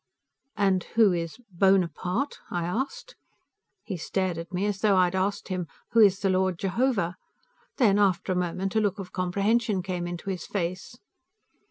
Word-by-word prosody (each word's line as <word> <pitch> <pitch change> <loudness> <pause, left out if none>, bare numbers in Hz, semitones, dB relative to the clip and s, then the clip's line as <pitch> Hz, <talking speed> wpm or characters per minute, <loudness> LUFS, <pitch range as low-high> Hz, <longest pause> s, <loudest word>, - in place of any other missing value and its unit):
"And 190 -3 +2
who 220 -5 +5
is 165 -2 -3
Bonaparte?" 190 - +1
I 175 -1 -2
asked. 265 - -4 0.7
He 195 -5 -5
stared 180 +1 -2
at 165 - -8
me 185 +2 -1
as 205 -2 -1
though 205 -3 +4
I 185 - +6
had 175 0 0
asked 190 +2 -1
him, 180 -2 -2 0.2
"Who 230 - +3
is 200 -3 +5
the 195 -2 +2
Lord 185 -1 +1
Jehovah?" 195 -2 0 0.6
Then, 210 -6 +4
after 190 -2 +2
a - - +1
moment, 180 +2 -2
a 220 - +4
look 205 -3 0
of 195 -3 -8
comprehension 200 +3 +1
came 180 -2 -3
into 175 +3 -4
his 180 -3 -5
face. 185 +4 -4
190 Hz, 170 wpm, -27 LUFS, 180-205 Hz, 0.7 s, I